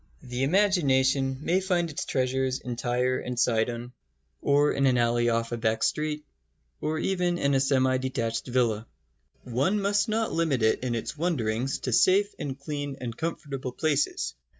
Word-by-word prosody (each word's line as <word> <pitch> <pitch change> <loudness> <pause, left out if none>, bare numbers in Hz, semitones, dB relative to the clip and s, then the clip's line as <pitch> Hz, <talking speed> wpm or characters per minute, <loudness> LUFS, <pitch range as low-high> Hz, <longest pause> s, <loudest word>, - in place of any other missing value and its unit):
The 125 -1 -4
imagination 135 -6 +2
may 180 +4 +2
find 175 -3 0
its 145 - -4
treasures 130 0 0
in 125 -2 -5
Tyre 125 +1 0
and 125 -1 -4
Sidon 120 +1 0 0.5
or 145 +1 +3
in 140 0 +2
an 125 -1 +3
alley 120 0 +2
off 115 0 0
a 120 - -2
back 110 -1 0
street, 150 0 -1 0.6
or 155 +1 -1
even 180 0 0
in 140 -4 +1
a 135 - +4
semi 130 -1 +2
detached 120 -3 -2
villa. 115 -3 0 0.6
One 135 - 0
must 205 +1 +1
not 220 +1 0
limit 155 -8 +1
it 110 - +3
in 125 -2 -2
its 115 - -4
wanderings 135 -7 -1
to 125 - -2
safe 200 - +4
and 140 -2 -4
clean 145 -1 -4
and 120 -2 -5
comfortable 140 -4 -4
places. 150 -1 0
135 Hz, 165 wpm, -27 LUFS, 120-155 Hz, 0.6 s, a